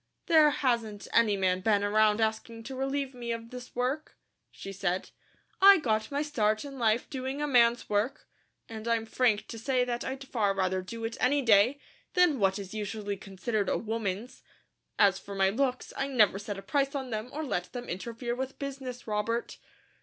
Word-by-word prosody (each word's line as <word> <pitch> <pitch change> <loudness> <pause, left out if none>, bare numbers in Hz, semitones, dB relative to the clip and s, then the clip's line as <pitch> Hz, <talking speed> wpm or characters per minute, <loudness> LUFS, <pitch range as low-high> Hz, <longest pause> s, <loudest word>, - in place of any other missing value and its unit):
"There 315 -3 +6
hasn't 230 -7 -1
any 215 -3 +4
man 185 -1 +1
been 205 0 +2
around 215 +1 +3
asking 225 +1 -2
to 265 +3 -7
relieve 270 +1 -2
me 240 -1 -5
of 230 0 -5
this 250 0 -9
work," 260 +5 -2 0.3
she 195 - -9
said. 190 -1 -2 0.5
"I 395 0 +9
got 220 -8 0
my 285 +1 -1
start 215 -6 0
in 275 -2 -8
life 225 0 +2
doing 265 0 -4
a 295 - 0
man's 240 -4 +3
work, 210 +6 -1 0.4
and 220 0 -7
I'm 230 -1 +1
frank 225 -2 +1
to 230 - -6
say 255 +2 +1
that 240 -1 -2
I'd 270 +1 -5
far 205 -6 0
rather 185 -1 0
do 225 +5 -6
it 230 +1 -4
any 280 +3 +2
day, 230 +4 +5 0.4
than 355 -7 +4
what 195 -1 +2
is 195 -1 -7
usually 210 -1 -3
considered 200 +2 -3
a - - +1
woman's. 225 +1 -4 0.6
As 195 -2 +4
for 200 0 -9
my 195 0 +3
looks, 255 +2 -1
I 275 - -1
never 215 -7 +3
set 205 -1 -5
a 195 - -8
price 280 -2 0
on 265 -3 -4
them 215 +2 -3
or 310 +2 -4
let 180 -11 -3
them 245 -1 -6
interfere 235 +6 -4
with 265 +2 -4
business, 265 -3 -6
Robert." 220 +2 -2
230 Hz, 190 wpm, -29 LUFS, 210-265 Hz, 0.6 s, I